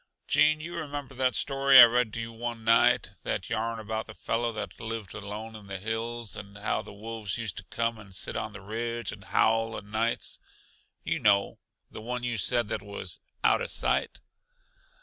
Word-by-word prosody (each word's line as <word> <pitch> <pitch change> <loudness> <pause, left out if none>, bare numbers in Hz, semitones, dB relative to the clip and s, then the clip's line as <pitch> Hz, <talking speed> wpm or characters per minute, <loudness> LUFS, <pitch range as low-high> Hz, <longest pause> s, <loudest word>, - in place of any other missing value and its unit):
"Gene, 155 +1 +4
you 170 +3 -6
remember 145 -4 -5
that 130 0 +1
story 135 -1 +6
I 120 - +14
read 120 -1 +2
to - - -4
you 115 0 -4
one 115 0 -5
night 115 +1 +4
that 95 - -3
yarn 115 0 -1
about 110 0 -4
the 110 - -10
fellow 115 +1 -1
that 105 -5 -6
lived 110 -3 -5
alone 105 +2 -6
in 105 -2 -11
the 95 -1 -4
hills, 115 +2 -3
and 100 0 -9
how 105 - 0
the - - -11
wolves 110 -1 -4
used 115 -5 -3
to - - -5
come 115 +5 -1
and 100 -3 -13
sit - - -1
on 110 - -3
the 100 - -9
ridge 115 +3 -3
and 100 -2 -11
howl 115 +2 +2
o' - - -3
nights 110 +3 -1 0.6
you - - -1
know, 100 -2 +3 0.3
the - - -8
one 125 +2 -4
you 120 -2 -1
said 120 +2 +2
was 100 0 -7 0.2
'out - - +4
uh - - -2
sight'? - - +1
115 Hz, 190 wpm, -28 LUFS, 105-120 Hz, 0.6 s, I